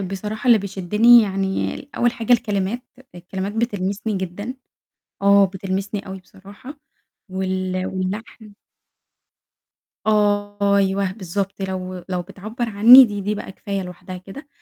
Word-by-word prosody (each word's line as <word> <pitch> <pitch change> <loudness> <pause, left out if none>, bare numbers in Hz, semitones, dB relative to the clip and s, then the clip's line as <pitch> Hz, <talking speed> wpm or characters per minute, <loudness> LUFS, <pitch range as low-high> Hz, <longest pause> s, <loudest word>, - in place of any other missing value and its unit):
بصراحة 210 +4 -5
اللي 235 -3 +6
بيشدني 210 +5 +4
يعني 195 +7 -2
أول 240 0 +2
حاجة 230 +1 0
الكلمات، 220 0 0 0.3
الكلمات 190 +3 -5
بتلمسني 205 -2 -2
جدًا، 190 +6 -5 0.7
آه 200 0 +6
بتلمسني 195 +2 -4
أوي 190 0 -7
بصراحة، 205 +10 -14 0.5
وال 185 0 -2
واللحن. 205 +3 -5 1.5
آه، 205 -1 +2
أيوه 195 -1 +1
بالضبط، 195 0 -4
لو 185 -1 -5
لو 180 -1 -2
بتعبّر 215 +6 -6
عنّي، 230 +5 +9
دي 205 -3 -4
دي 205 +2 -2
بقى 190 - -7
كفاية 200 -1 -4
لوحدها 180 +1 -9
كده، 200 +11 -11
200 Hz, 120 wpm, -21 LUFS, 190-215 Hz, 1.5 s, عنّي